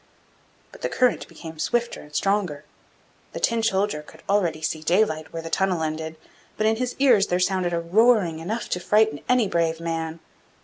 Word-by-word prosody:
But -, -, -15 dB
the -, -, -1 dB
current 250 Hz, -1 st, +1 dB
became 160 Hz, -2 st, -10 dB
swifter 235 Hz, +9 st, -1 dB
and 150 Hz, 0 st, -14 dB
stronger. 185 Hz, -8 st, 0 dB, 0.7 s
The -, -, -4 dB
Tin 230 Hz, -1 st, +1 dB
soldier 200 Hz, -6 st, 0 dB
could 160 Hz, +1 st, -16 dB
already 180 Hz, -6 st, +1 dB
see 155 Hz, 0 st, -2 dB
daylight 160 Hz, -2 st, +1 dB
where 165 Hz, 0 st, -5 dB
the 165 Hz, -, -7 dB
tunnel 185 Hz, -3 st, +1 dB
ended; 160 Hz, 0 st, -3 dB, 0.4 s
but 215 Hz, -, 0 dB
in 220 Hz, 0 st, +3 dB
his 250 Hz, +1 st, -2 dB
ears 245 Hz, -8 st, +4 dB
there 180 Hz, -, 0 dB
sounded 185 Hz, -1 st, +1 dB
a 170 Hz, -, 0 dB
roaring 185 Hz, -1 st, +3 dB
enough 215 Hz, +8 st, -3 dB
to 180 Hz, -, -1 dB
frighten 210 Hz, -6 st, +2 dB
any 250 Hz, -4 st, +4 dB
brave 165 Hz, -2 st, 0 dB
man. 165 Hz, -1 st, -3 dB
180 Hz, 180 wpm, -24 LUFS, 160-215 Hz, 0.7 s, ears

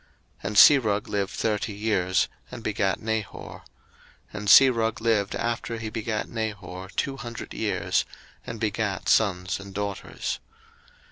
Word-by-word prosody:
01:011:022 -, -, -2 dB
And 105 Hz, -, -2 dB, 0.4 s
Serug 105 Hz, -, -5 dB
lived 100 Hz, -2 st, -1 dB
thirty 105 Hz, -1 st, -1 dB
years, 100 Hz, -3 st, +1 dB, 0.2 s
and 120 Hz, -2 st, -9 dB
begat 100 Hz, -3 st, 0 dB
Nahor: 110 Hz, -2 st, -4 dB
01:011:023 -, -, -26 dB, 0.7 s
And 105 Hz, -, -5 dB
Serug 115 Hz, 0 st, +6 dB
lived 110 Hz, -4 st, +1 dB
after 115 Hz, 0 st, -2 dB
he 110 Hz, -1 st, -5 dB
begat 110 Hz, -1 st, -3 dB
Nahor 95 Hz, -5 st, -5 dB
two 135 Hz, -1 st, -1 dB
hundred 120 Hz, -4 st, -7 dB
years, -, -, 0 dB, 0.4 s
and 115 Hz, -, -7 dB
begat 105 Hz, -3 st, -2 dB
sons 90 Hz, -4 st, +2 dB
and 100 Hz, -1 st, -11 dB
daughters. 100 Hz, -1 st, -4 dB
105 Hz, 135 wpm, -26 LUFS, 100-115 Hz, 0.7 s, Serug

